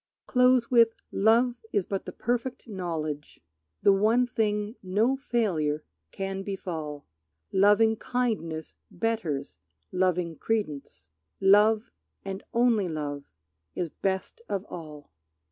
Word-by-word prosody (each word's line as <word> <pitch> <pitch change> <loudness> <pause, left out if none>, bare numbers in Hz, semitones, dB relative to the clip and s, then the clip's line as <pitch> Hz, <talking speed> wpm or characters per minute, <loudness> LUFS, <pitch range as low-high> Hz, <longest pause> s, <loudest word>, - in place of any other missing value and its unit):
Close 250 -1 +4
with, 230 -2 +5 0.2
"Love 235 +4 +3
is 200 -4 +1
but 195 -1 -3
the - - -5
perfect 245 +2 -2
knowledge, 160 -7 -4 0.4
The 200 - +7
one 220 +5 +3
thing 215 -2 -1
no 210 +8 +2
failure 180 - 0 0.3
can 195 0 -3
befall; 165 -7 -5 0.5
Lovingkindness 210 -4 +2 0.2
betters 180 -8 -2 0.3
loving 180 -3 0
credence; 150 - -3 0.3
Love 210 +3 +5 0.3
and 195 0 -4
only 235 -5 +3
love 145 -3 -4 0.5
is 175 - -2
best 190 +6 -3
of 200 -1 -2
all." 150 -4 -9
195 Hz, 105 wpm, -28 LUFS, 165-225 Hz, 0.5 s, The